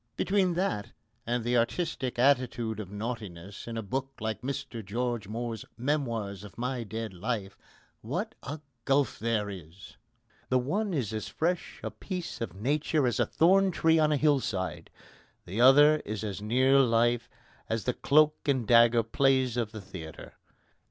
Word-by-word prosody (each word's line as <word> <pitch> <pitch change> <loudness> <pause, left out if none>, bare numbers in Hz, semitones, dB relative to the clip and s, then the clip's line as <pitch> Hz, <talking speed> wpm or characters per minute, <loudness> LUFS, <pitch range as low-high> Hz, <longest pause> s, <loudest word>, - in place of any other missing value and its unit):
Between 190 -3 +2
that 170 - -1 0.3
and 120 0 0
the 120 +1 0
artistic 130 +1 -1
attitude 120 -4 +2
of 100 -3 -6
naughtiness 105 -3 -6
in 115 -1 -4
a 115 - -3
book 135 +6 -3
like 110 0 -3
Mr 125 -3 -4
George 115 +1 -2
Moore's 115 0 -4
Memoirs 115 -7 -2
of 105 - -12
My 125 0 -2
Dead 110 0 -5
Life, 100 +1 -3 0.5
what - - -3
a 145 +4 -6 0.2
gulf 135 0 +2
there 110 -2 0
is! 90 -1 -10 0.5
The 130 - +3
one 190 - -1
is 125 - -2
as 110 -1 -3
fresh 175 +2 -2
a - - -3
piece 180 -7 -6
of 100 -6 -4
nature 145 +6 +1
as 120 -4 0
a - - +2
thorn 190 +4 +4
tree 160 -2 +3
on 155 -1 +3
a 150 - +3
hill 145 -1 +3
side; 95 -7 -4 0.6
the 100 +6 -2
other 145 +4 +7
is 110 -7 -5
as 100 -2 -4
near 130 +5 +4
life 120 -1 +2 0.4
as 110 -2 -1
the 125 - 0
cloak 155 +3 +4
and 130 -6 +1
dagger 115 0 +6
plays 130 +1 +2
of 115 -3 -1
the 110 -2 -7
theatre. 80 -4 -9
120 Hz, 165 wpm, -29 LUFS, 110-140 Hz, 0.6 s, other